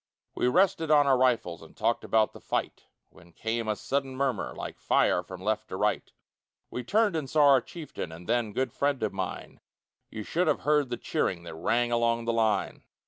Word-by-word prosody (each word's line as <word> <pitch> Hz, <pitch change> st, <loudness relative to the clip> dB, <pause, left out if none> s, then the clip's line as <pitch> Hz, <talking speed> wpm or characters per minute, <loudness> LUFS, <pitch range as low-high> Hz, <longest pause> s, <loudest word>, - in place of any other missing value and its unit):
We -, -, 0 dB
rested 165 Hz, +1 st, +2 dB
on 150 Hz, -2 st, +6 dB
our 135 Hz, -1 st, +4 dB
rifles 120 Hz, -9 st, +1 dB
And -, -, -15 dB
talked -, -, 0 dB
about 110 Hz, -1 st, +2 dB
the -, -, -11 dB
fight, -, -, -3 dB, 0.3 s
When 85 Hz, 0 st, -18 dB
came 115 Hz, +3 st, -3 dB
a 105 Hz, -, 0 dB
sudden 135 Hz, +3 st, -2 dB
murmur 130 Hz, -6 st, -1 dB
Like -, -, -7 dB
fire -, -, +2 dB
from 90 Hz, 0 st, -10 dB
left 110 Hz, +1 st, -1 dB
to -, -, -5 dB
right; -, -, -1 dB, 0.6 s
We 125 Hz, -, -4 dB
turned 205 Hz, -, +2 dB
and 150 Hz, -4 st, -3 dB
saw 150 Hz, -1 st, +5 dB
our 135 Hz, -2 st, +6 dB
chieftain, 155 Hz, -, -7 dB
And 85 Hz, +2 st, -11 dB
then, 120 Hz, -3 st, 0 dB
good 130 Hz, +2 st, -2 dB
friend 140 Hz, -4 st, 0 dB
of 110 Hz, -, -1 dB
mine, -, -, -5 dB, 0.5 s
You 110 Hz, -, -6 dB
should 175 Hz, -, 0 dB
have -, -, +1 dB
heard 150 Hz, -3 st, +2 dB
the 120 Hz, -, -3 dB
cheering 85 Hz, -2 st, -2 dB
That 85 Hz, -, -8 dB
rang 120 Hz, +9 st, 0 dB
along 115 Hz, 0 st, +1 dB
the 115 Hz, -, 0 dB
line. 110 Hz, -3 st, 0 dB
120 Hz, 200 wpm, -28 LUFS, 110-140 Hz, 0.6 s, on